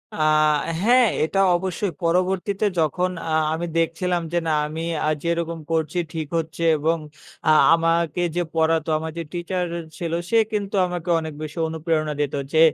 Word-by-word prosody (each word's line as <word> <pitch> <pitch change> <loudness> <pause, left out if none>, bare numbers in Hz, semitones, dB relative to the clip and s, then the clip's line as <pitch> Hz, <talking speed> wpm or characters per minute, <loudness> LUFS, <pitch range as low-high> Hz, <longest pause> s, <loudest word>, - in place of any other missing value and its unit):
আ - - -7 0.6
হ্যাঁ, 245 +2 +5 0.2
এটা 195 +5 0 0.2
অবশ্যই। 190 +1 -2
পরবর্তীতে 185 +4 +1
যখন 180 +4 +1 0.2
আ 160 - -2 0.2
আমি 170 +2 -2
দেখছিলাম 170 +2 0
যে 175 - +2
না, - - +1 0.2
আমি 160 +2 -5 0.2
আ - - +1 0.2
যেরকম 170 -1 -1
করছি 160 +1 0 0.2
ঠিক 160 -2 -3
হচ্ছে, 165 +1 -5
এবং 160 +3 +1 0.5
আ - - +5 0.2
আমাকে 165 0 +1
যে 175 - +1
পড়াতো, 160 0 +2
আমার 160 +1 -4
যে 165 - -2
টিচার 180 +1 -2 0.3
ছিল, 170 -2 -3 0.2
সে 230 - +3
কিন্তু 205 -1 -2
আমাকে 175 0 -5
অনেক 160 -1 -6
বেশি 155 +1 -7
অনুপ্রেরণা 160 -1 -1
দিত 145 - -1 0.2
যে 160 - +4
170 Hz, 160 wpm, -23 LUFS, 160-180 Hz, 0.6 s, হ্যাঁ